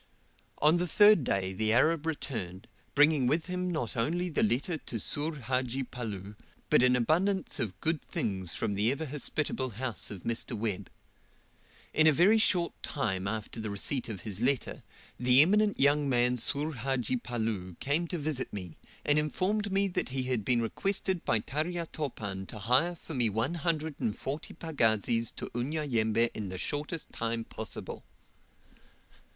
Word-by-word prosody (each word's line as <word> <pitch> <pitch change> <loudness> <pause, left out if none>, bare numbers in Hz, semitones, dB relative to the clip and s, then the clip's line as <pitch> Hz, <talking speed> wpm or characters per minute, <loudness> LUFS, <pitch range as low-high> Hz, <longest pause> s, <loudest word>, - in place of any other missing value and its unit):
On 155 +3 +6
the 180 +1 0
third 205 -2 +6
day 95 -5 0
the 110 +3 +1
Arab 155 +6 +3
returned, 100 - -4 0.3
bringing 145 -2 +5
with 155 +5 +1
him 180 0 -2
not 155 -10 -2
only 170 +10 0
the 160 - 0
letter 130 - +1
to 115 - -5
Soor 150 +9 -1
Hadji 130 0 -1
Palloo, 105 -5 -6 0.4
but - - +6
an 125 0 +5
abundance 175 - +1
of 105 -7 -3
good 160 -2 0
things 95 -5 +2
from 105 - -1
the 105 +4 +2
ever 140 +4 -3
hospitable 145 -2 -1
house 125 -2 -3
of 100 -4 -8
Mr. 115 0 -2
Webb. 105 -3 -3 1.0
In 155 0 +5
a - - +8
very 185 +9 +5
short 180 -5 +2
time 95 -9 -2
after 110 +2 -4
the 110 -1 -3
receipt 120 +6 -2
of 100 -5 -6
his 105 +1 -4
letter, 130 +1 +1 0.4
the 125 +1 +5
eminent 210 +4 +2
young 145 +1 +3
man 125 -1 +3
Soor 145 +6 -1
Hadji 130 -1 -1
Palloo 110 -7 -3
came 155 +5 +1
to 175 - -3
visit 150 -4 -2
me, 90 -5 -7 0.3
and 145 +1 +4
informed 200 +7 -1
me 195 0 +2 0.2
he 130 0 -2
had 125 -4 -1
been 120 +1 +2
requested 190 - -1
by 115 - +3
Tarya 165 +6 -2
Topan 100 -10 -4
to - - -8
hire 125 - +2
for 165 - -10
me 120 -5 +2
one 115 +9 -1
hundred 160 -2 -2
and 105 - -1
forty 140 +4 -4
pagazis 115 - +1
to - - -6
Unyanyembe 120 -4 0
in 105 -3 -5
the 95 - -5
shortest 150 - -2
time 115 0 -2
possible. 110 -1 -6
130 Hz, 165 wpm, -30 LUFS, 110-160 Hz, 1.0 s, a